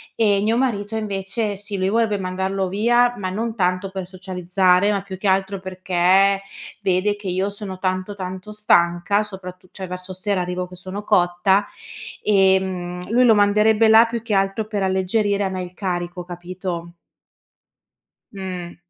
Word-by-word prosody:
e 205 Hz, -3 st, +3 dB
mio 225 Hz, +3 st, +1 dB
marito 220 Hz, -4 st, -1 dB
invece 205 Hz, 0 st, -2 dB
sì, 205 Hz, 0 st, -6 dB
lui 190 Hz, +1 st, 0 dB
vorre 220 Hz, -1 st, +1 dB
mandarlo 190 Hz, +1 st, -2 dB
via, 240 Hz, +5 st, +3 dB
ma 185 Hz, -2 st, -3 dB
non 225 Hz, +4 st, -3 dB
tanto 185 Hz, 0 st, 0 dB
per 190 Hz, -2 st, -5 dB
socializzare, 185 Hz, +1 st, +1 dB
ma 200 Hz, -1 st, -1 dB
più 190 Hz, -2 st, -8 dB
che 205 Hz, -, -2 dB
altro 195 Hz, +1 st, +1 dB
perché 185 Hz, +1 st, +2 dB, 0.4 s
vede 195 Hz, +2 st, +1 dB
che 205 Hz, -2 st, -9 dB
io 190 Hz, +3 st, -1 dB
sono 200 Hz, -2 st, -7 dB
tanto, 185 Hz, +2 st, -2 dB
tanto 185 Hz, +2 st, -6 dB
stanca, 175 Hz, -1 st, +2 dB
soprattu 185 Hz, -3 st, -9 dB
cioè 190 Hz, -, -7 dB
verso 180 Hz, +1 st, -7 dB
sera 190 Hz, 0 st, -1 dB
arrivo 180 Hz, 0 st, -3 dB
che 180 Hz, -, -12 dB
sono 190 Hz, +3 st, -7 dB
cotta, 185 Hz, +2 st, +2 dB, 0.6 s
ehm, 190 Hz, -2 st, +1 dB
lui 250 Hz, +2 st, +4 dB
lo 225 Hz, -3 st, +6 dB
manderebbe 210 Hz, +2 st, +4 dB
là 220 Hz, +1 st, +7 dB
più 230 Hz, -1 st, -4 dB
che 220 Hz, -3 st, -3 dB
altro 195 Hz, +2 st, +1 dB
per 210 Hz, -2 st, -3 dB
alleggerire 200 Hz, +2 st, +1 dB
a 190 Hz, -, 0 dB
me 185 Hz, -1 st, -4 dB
il 180 Hz, 0 st, -7 dB
carico, 175 Hz, -2 st, -3 dB
capito? 175 Hz, -1 st, -6 dB, 1.4 s
Mh. 185 Hz, -3 st, -6 dB
190 Hz, 160 wpm, -21 LUFS, 185-205 Hz, 1.4 s, là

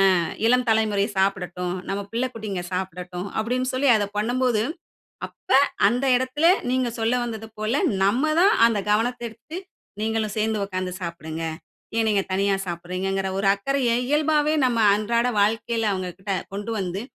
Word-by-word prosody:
ஆ -, -, +2 dB, 0.3 s
இளம் 250 Hz, +2 st, +4 dB
தலைமுறை 215 Hz, -2 st, +2 dB
சாப்பிடட்டும். 180 Hz, -2 st, -1 dB
நம்ம 195 Hz, -, -1 dB
பிள்ளை 240 Hz, +3 st, 0 dB
குட்டிங்க 210 Hz, -5 st, -4 dB
சாப்பிடட்டும். 180 Hz, 0 st, -4 dB
அப்பிடின்னு 250 Hz, +3 st, -1 dB
சொல்லி 265 Hz, +2 st, +2 dB
அத 210 Hz, -2 st, +1 dB
பண்ணும்போது, 240 Hz, +1 st, +1 dB, 0.7 s
அப்ப -, -, -30 dB, 0.4 s
அந்த 245 Hz, +6 st, 0 dB
இடத்தில 260 Hz, +5 st, 0 dB, 0.3 s
நீங்க 255 Hz, -1 st, +1 dB
சொல்ல 225 Hz, +2 st, +1 dB
வந்தது 225 Hz, -2 st, -5 dB
போல, 215 Hz, +2 st, -1 dB, 0.3 s
நம்ம 220 Hz, +8 st, +2 dB, 0.2 s
தான் 400 Hz, +3 st, +6 dB
அந்த 225 Hz, -3 st, 0 dB
கவனத்த 235 Hz, +4 st, +1 dB
எடுத்து 230 Hz, +9 st, -10 dB, 0.4 s
நீங்களும் 220 Hz, -1 st, -1 dB
சேர்ந்து 215 Hz, -1 st, 0 dB
உட்கார்ந்து 185 Hz, -1 st, -4 dB
சாப்பிடுங்க. 165 Hz, -2 st, -5 dB, 0.5 s
ஏன் 225 Hz, -1 st, +2 dB
நீங்க 205 Hz, -2 st, +2 dB
தனியா 195 Hz, +1 st, +2 dB
சாப்பிடுகிறீங்கிற? 185 Hz, +3 st, -2 dB
ஒரு 195 Hz, -, +1 dB
அக்கறைய 255 Hz, +4 st, 0 dB, 0.2 s
இயல்பாவே 300 Hz, 0 st, +2 dB
நம்ம 245 Hz, -2 st, +1 dB, 0.2 s
அன்றாட 235 Hz, +3 st, +1 dB
வாழ்க்கையில 225 Hz, +1 st, +1 dB
அவங்கக்கிட்ட 185 Hz, +1 st, -4 dB, 0.2 s
கொண்டு 205 Hz, +3 st, -4 dB
வந்து, 185 Hz, +1 st, -3 dB
215 Hz, 145 wpm, -24 LUFS, 190-240 Hz, 0.7 s, தான்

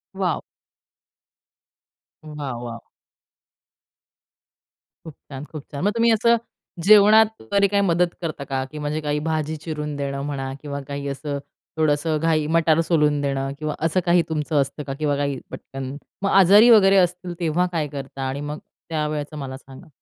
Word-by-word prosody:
Wow! 185 Hz, -5 st, -1 dB, 1.8 s
वाह! 150 Hz, -3 st, -6 dB
वाह! 115 Hz, -1 st, -6 dB, 2.3 s
खूप 160 Hz, -, -9 dB, 0.2 s
छान, 135 Hz, +1 st, -7 dB
खूप 155 Hz, -2 st, -9 dB
छान. 140 Hz, +3 st, -5 dB
मग 205 Hz, -, +3 dB
तुम्ही 230 Hz, 0 st, +4 dB
असं 235 Hz, +2 st, +4 dB, 0.5 s
जेवणात 215 Hz, +2 st, +8 dB, 0.3 s
कधी 200 Hz, 0 st, +4 dB
काही 200 Hz, 0 st, +1 dB
मदत 175 Hz, -1 st, +3 dB
करता 155 Hz, -4 st, -4 dB
का, 135 Hz, -1 st, -2 dB
की 155 Hz, -, -8 dB
म्हणजे 150 Hz, +1 st, -2 dB
काही 150 Hz, 0 st, -1 dB
भाजी 155 Hz, 0 st, -1 dB
चिरून 150 Hz, -2 st, -4 dB
देणं 140 Hz, -1 st, -3 dB
म्हणा 135 Hz, -2 st, -4 dB
किंवा 140 Hz, -1 st, -5 dB
काही 140 Hz, 0 st, -5 dB
असं 140 Hz, +1 st, -4 dB, 0.4 s
थोडंसं 155 Hz, 0 st, +1 dB
घाई 160 Hz, -1 st, +1 dB
मटार 160 Hz, -1 st, +3 dB
सोलून 150 Hz, -3 st, +2 dB
देणं 135 Hz, -1 st, -1 dB
किंवा 155 Hz, -1 st, -3 dB
असं 165 Hz, +3 st, +2 dB
काही 175 Hz, 0 st, +4 dB
तुमचं 150 Hz, -1 st, 0 dB
असतं 140 Hz, +2 st, -4 dB
का? 135 Hz, -, -5 dB
किंवा 145 Hz, 0 st, -1 dB
काही 140 Hz, -2 st, -1 dB
पटकन. 135 Hz, 0 st, -7 dB, 0.3 s
मग 195 Hz, -, +2 dB
आजारी 195 Hz, +5 st, +7 dB
वगैरे 195 Hz, -4 st, +7 dB
असतील 180 Hz, -1 st, +1 dB
तेव्हा 170 Hz, +1 st, +1 dB
काय 160 Hz, -4 st, -1 dB
करता? 135 Hz, -1 st, -7 dB
आणि 135 Hz, +2 st, -4 dB
मग 145 Hz, +1 st, -5 dB, 0.3 s
त्यावेळचं 150 Hz, -1 st, -3 dB
मला 135 Hz, -2 st, -6 dB
सांगा. 135 Hz, +5 st, -14 dB
150 Hz, 155 wpm, -22 LUFS, 140-175 Hz, 2.3 s, जेवणात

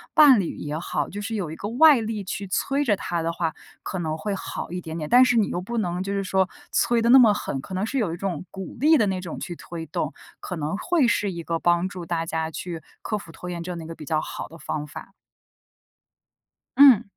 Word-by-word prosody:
伴 285 Hz, -6 st, +8 dB
侣 180 Hz, -, -2 dB
也 150 Hz, +1 st, -4 dB
好， -, -, -2 dB
就 205 Hz, -, -6 dB
是 220 Hz, +2 st, -3 dB
有 180 Hz, -7 st, -3 dB
一 -, -, -6 dB
个 205 Hz, -, -5 dB
外 275 Hz, +2 st, +6 dB
力 220 Hz, -2 st, -3 dB
去 195 Hz, +1 st, -5 dB
催 275 Hz, +9 st, 0 dB
着 225 Hz, -7 st, +3 dB
他 170 Hz, -2 st, -2 dB
的 165 Hz, +1 st, -1 dB
话， 165 Hz, -1 st, -2 dB, 0.3 s
可 -, -, -4 dB
能 160 Hz, -2 st, -2 dB
会 205 Hz, +5 st, -3 dB
好 190 Hz, -, -6 dB
一 180 Hz, +1 st, -4 dB
点 160 Hz, -1 st, -6 dB
点， 155 Hz, -2 st, -4 dB
但 250 Hz, +1 st, +8 dB
是 250 Hz, -2 st, +3 dB
你 215 Hz, -, +3 dB
又 175 Hz, -, -2 dB
不 235 Hz, +6 st, -4 dB
能 180 Hz, -4 st, -1 dB
就 195 Hz, -, -4 dB
是 200 Hz, 0 st, -1 dB
说 190 Hz, 0 st, +1 dB, 0.2 s
催 240 Hz, -1 st, +2 dB
得 230 Hz, -, +2 dB
那 265 Hz, +2 st, +9 dB
么 225 Hz, -4 st, +7 dB
狠， 140 Hz, -9 st, -3 dB
可 190 Hz, -, -9 dB
能 190 Hz, +3 st, 0 dB
是 265 Hz, +5 st, -3 dB
有 195 Hz, -8 st, 0 dB
一 -, -, -5 dB
种 180 Hz, -3 st, -3 dB
鼓 190 Hz, -1 st, -7 dB
励 310 Hz, +4 st, +6 dB
的 225 Hz, -, +3 dB
那 190 Hz, -1 st, -1 dB
种 175 Hz, -3 st, -6 dB
去 175 Hz, -, -5 dB
推 165 Hz, -1 st, -7 dB
动， 155 Hz, 0 st, -2 dB, 0.3 s
可 180 Hz, -, -5 dB
能 155 Hz, +3 st, -2 dB
会 330 Hz, -, +2 dB
是 205 Hz, -3 st, +1 dB
一 170 Hz, -2 st, -6 dB
个 165 Hz, 0 st, -2 dB
帮 175 Hz, +1 st, +2 dB
助 180 Hz, -2 st, -7 dB
大 165 Hz, 0 st, -1 dB
家 160 Hz, -1 st, -2 dB
去 170 Hz, 0 st, -6 dB, 0.2 s
克 215 Hz, -, -1 dB
服 170 Hz, -5 st, -10 dB
拖 180 Hz, +2 st, -8 dB
延 175 Hz, -1 st, -4 dB
症 175 Hz, 0 st, -5 dB
的 165 Hz, -, -7 dB
一 -, -, -9 dB
个 165 Hz, -, -7 dB
比 155 Hz, -, -10 dB
较 155 Hz, +1 st, +1 dB
好 -, -, -6 dB
的 165 Hz, -, -12 dB
方 150 Hz, -2 st, -4 dB
法。 170 Hz, -, -10 dB, 1.7 s
嗯。 265 Hz, -6 st, +8 dB
185 Hz, 275 characters per minute, -24 LUFS, 165-220 Hz, 1.7 s, 那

